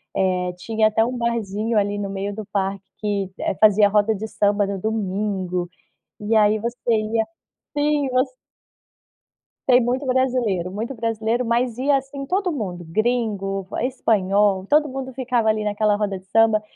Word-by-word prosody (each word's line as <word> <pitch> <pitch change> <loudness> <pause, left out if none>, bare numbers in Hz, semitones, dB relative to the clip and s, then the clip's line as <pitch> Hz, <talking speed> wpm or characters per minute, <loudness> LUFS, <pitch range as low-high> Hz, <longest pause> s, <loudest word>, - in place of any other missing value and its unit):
eh, 180 -1 0
tinha 220 +3 +1
até 215 +1 +2
um 245 +2 -2
barzinho 225 -2 -1
ali 205 0 +1
no 200 -1 -3
meio 195 +1 -3
do 215 +1 -6
parque 195 0 -1 0.2
que, 200 -3 -1
eh, - - 0
fazia 210 0 +6
a - - -2
roda 210 +1 +2
de 215 +2 -5
samba 205 0 +2
no 195 0 -3
domingo. 190 -4 -2 0.5
E 215 +2 0
aí 215 0 +4
você 235 +3 -3 0.2
ia 220 0 +1 0.5
sim, 290 -1 +1
você 255 0 0 1.3
Tem 250 -1 +6
muito 255 +4 -1
brasileiro, 250 -9 0
muito 225 +7 -4
brasileiro, 225 +1 -1
mas 235 0 0
ia 275 +2 +3
assim 275 +1 -6
todo 370 +4 0
mundo, 190 - -4
gringo, 205 -1 -1
va - - -3
espanhol, 205 -6 +2
todo 300 0 +3
mundo 260 0 -5
ficava 245 -3 0
ali 215 0 +1
naquela 210 0 +1
roda 205 -2 -1
de 185 - -16
samba 220 +2 +3
215 Hz, 165 wpm, -22 LUFS, 200-245 Hz, 1.3 s, fazia